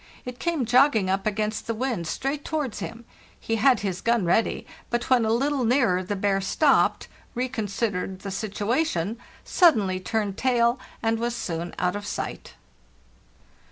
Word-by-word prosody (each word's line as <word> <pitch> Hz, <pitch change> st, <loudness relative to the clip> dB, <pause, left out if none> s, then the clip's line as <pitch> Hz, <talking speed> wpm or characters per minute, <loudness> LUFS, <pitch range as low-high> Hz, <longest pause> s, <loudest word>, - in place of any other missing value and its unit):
It 250 Hz, 0 st, -7 dB
came 335 Hz, -7 st, 0 dB
jogging 245 Hz, -5 st, +4 dB
up 195 Hz, +2 st, 0 dB
against 215 Hz, +1 st, -2 dB
the 230 Hz, -, -1 dB
wind 230 Hz, -8 st, -2 dB
straight 275 Hz, -, -2 dB
towards 295 Hz, -8 st, -3 dB
him. 230 Hz, +1 st, -7 dB, 0.3 s
He 225 Hz, -, -1 dB
had 255 Hz, +3 st, +4 dB
his 190 Hz, -2 st, -3 dB
gun 235 Hz, -4 st, +2 dB
ready, 200 Hz, +6 st, +1 dB, 0.2 s
but 240 Hz, +2 st, -2 dB
when 245 Hz, -3 st, +5 dB
a 220 Hz, -, +1 dB
little 275 Hz, +3 st, +1 dB
nearer 235 Hz, -7 st, +3 dB
the 190 Hz, +2 st, -3 dB
bear 195 Hz, 0 st, +1 dB
stopped, 275 Hz, +9 st, +2 dB, 0.3 s
reconsidered 210 Hz, -5 st, -2 dB
the 200 Hz, -, -5 dB
situation, 215 Hz, -, -1 dB, 0.2 s
sud 345 Hz, -6 st, +5 dB
denly 185 Hz, -3 st, -2 dB
turned 205 Hz, -2 st, -1 dB
tail, 240 Hz, -1 st, +2 dB, 0.2 s
and 225 Hz, 0 st, +1 dB
was 235 Hz, +1 st, -1 dB
soon 170 Hz, -6 st, -4 dB
out 180 Hz, +1 st, 0 dB
of 205 Hz, 0 st, -5 dB
sight. -, -, -5 dB
225 Hz, 160 wpm, -25 LUFS, 195-250 Hz, 0.3 s, when